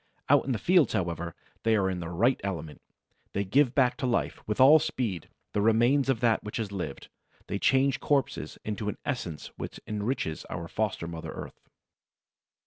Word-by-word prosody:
Out - - +5
in 135 - -1
the 120 - +1
fields, 175 - +3
however, 85 -2 -2 0.3
they 115 -1 +3
are 100 -3 +2
in 95 -1 -2
their 85 -1 -5
right 115 +10 +2
element. 80 -6 -5 0.5
They 100 - 0
give 125 +6 +2
back 125 -3 +3
to 130 - -1
life, 120 - -1
with 105 - -2
all 145 +5 +8
speed, 120 - -3 0.2
the 105 - +1
remains 120 +6 +3
of 125 -4 +1
that 115 -3 +3
which 105 - -5
has 110 -4 -3
lived; 85 -8 -5 0.4
they 100 - -3
change 135 +2 +3
corpses 140 -3 0
into 105 0 -2
an - - -5
essence 90 - -4
which - - -6
enriches 105 -5 -2
our 85 - -5
foster 105 -3 -2
mother 85 -1 -6
earth. - - -9
110 Hz, 180 wpm, -28 LUFS, 95-130 Hz, 0.5 s, all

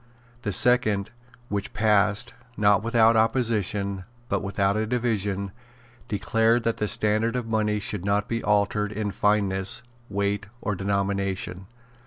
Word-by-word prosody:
The 105 - -2
second, 110 -3 +3 0.4
which 100 -2 -4
passed, 105 +2 +2 0.2
not 105 0 +4
without 115 0 +4
opposition, 105 -4 0 0.3
but - - 0
without 100 0 0
a 110 0 -1
division, 105 -5 -1 0.6
declared 115 +3 +1
that 115 0 0
the 105 - -1
standard 110 +1 +1
of 125 -2 -2
money 110 -2 0
should 100 -2 -4
not 100 +1 0
be 115 0 -3
altered 105 0 +1
in 105 -1 -3
fineness, 100 0 0 0.3
weight 100 0 -1
or 105 - -2
denomination. 95 -1 -2
105 Hz, 130 wpm, -25 LUFS, 100-110 Hz, 0.6 s, not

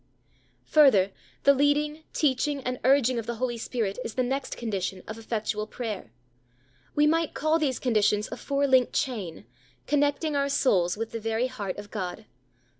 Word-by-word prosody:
Further, 235 -11 +5 0.3
the 280 - +7
leading, 295 +2 +1
teaching, 280 -1 0
and 250 0 -3
urging 255 -2 +4
of 225 - -6
the 235 - -2
Holy 245 +1 -1
Ghost 235 +2 -7 0.3
is 225 - -6
the 255 - +1
next 265 +2 -3
condition 195 -5 -3
of 220 +1 -7
effectual 215 -1 -2
prayer. 215 - -5 0.8
We 295 - +4
might 325 +1 +1
call 310 +2 +2
these 275 -5 0
conditions 210 -3 +2
a 245 - -5
four 280 +1 0
linked 260 -3 +3
chain, 205 -11 -3 0.4
connecting 290 +1 +1
our 280 0 +1
souls 195 -10 +2
with 225 +1 -4
the 230 - -4
very 225 +2 0
heart 215 -7 -4
of 205 0 -9
God. 185 -1 -5
250 Hz, 165 wpm, -27 LUFS, 215-280 Hz, 0.8 s, the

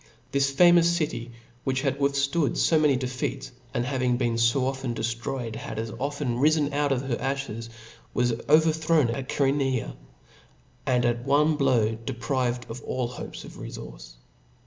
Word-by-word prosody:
This 140 0 +2
famous 170 +3 +6
city, 155 -8 -2 0.3
which 135 0 -1
had 140 -1 0
ciup/^^ 140 0 +3 0.2
withftood 165 -5 +1
fo 160 - +4
many 150 -3 +4
defeats, 125 0 -3 0.2
and 120 - -1
after 130 - -3
having 125 -2 +1
been 120 -2 0
fo 115 +3 +2
often 130 -2 -2
dellroyed, 115 0 -3
had - - -6
as 110 0 -3
often 140 -3 -2
rifen 150 +1 +3
out 145 0 +1
of 135 -1 0
her 130 -3 -1
aflies, 135 -4 -3 0.4
was 120 -1 +1 0.2
overthrown 155 -2 +4
at 130 +2 -5
Chseronea, 135 -3 0 0.9
and 125 -1 +2
at 120 0 0
one 150 +4 +3
blow 125 -6 +2
deprived 120 +1 -2
of 115 +2 -7
all 125 -2 -2
hopes 125 - -8
of - - -11
refource. - - -9
130 Hz, 160 wpm, -26 LUFS, 120-145 Hz, 0.9 s, famous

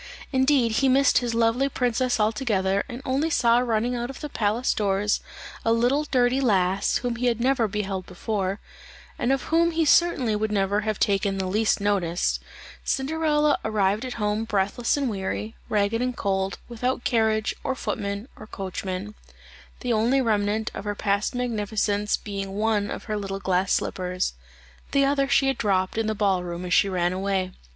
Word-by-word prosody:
Indeed 260 -3 +3
he 270 - +4
missed 275 +1 +4
his 240 -2 -2
lovely 230 +4 +2
princess 250 -1 0
altogether, 210 -3 +1
and 245 +2 -7
only 275 +5 0
saw 235 -6 +4
running 240 0 0
out 240 +1 -3
of 270 - -8
the 300 - -5
palace 225 +1 0
doors 205 0 +1 0.4
a 225 - +2
little 245 +6 +2
dirty 255 -1 +2
lass 195 -5 +2
whom 240 -1 -1
he 250 +1 0
had 235 -2 +1
never 245 -2 +2
beheld 195 -2 -3
before, 195 +1 -2 0.6
and 240 - +1
of 270 - +1
whom 335 +1 +4
he 325 -1 +1
certainly 285 -8 +3
would 215 0 -1
never 200 0 +1
have 215 -1 -2
taken 195 -1 +1
the 190 - -1
least 215 +4 +1
notice, 190 -4 0 0.4
Cinderella 300 +1 +1
arrived 210 0 +1
at 255 -1 -4
home 210 0 -1
breathless 210 +4 0
and 280 -2 0
weary, 210 +1 -3
ragged 210 +2 +1
and 250 0 -2
cold, 190 0 -1
without 245 +2 -2
carriage, 220 -2 +1
or 265 - -1
footmen, 200 -1 -3
or 215 - -11
coachman; 190 +1 -5 0.7
the 245 -2 0
only 235 +5 +2
remnant 215 -2 0
of - - -6
her 205 0 -2
past 200 +3 0
magnificence 210 -3 0
being 195 -1 -5
one 210 -1 +1
of - - -5
her 215 -2 -3
little 195 -1 -4
glass 190 0 0
slippers; 180 - -1 0.6
the 280 -1 +4
other 275 0 +2
she 275 - +4
had 270 -2 0
dropped 190 -3 +1
in 225 0 0
the 220 - -1
ball 195 -3 +1
room 175 0 -5
as 180 - -1
she 200 - +4
ran 180 -1 0
away. 190 -1 -1
215 Hz, 175 wpm, -25 LUFS, 200-250 Hz, 0.7 s, he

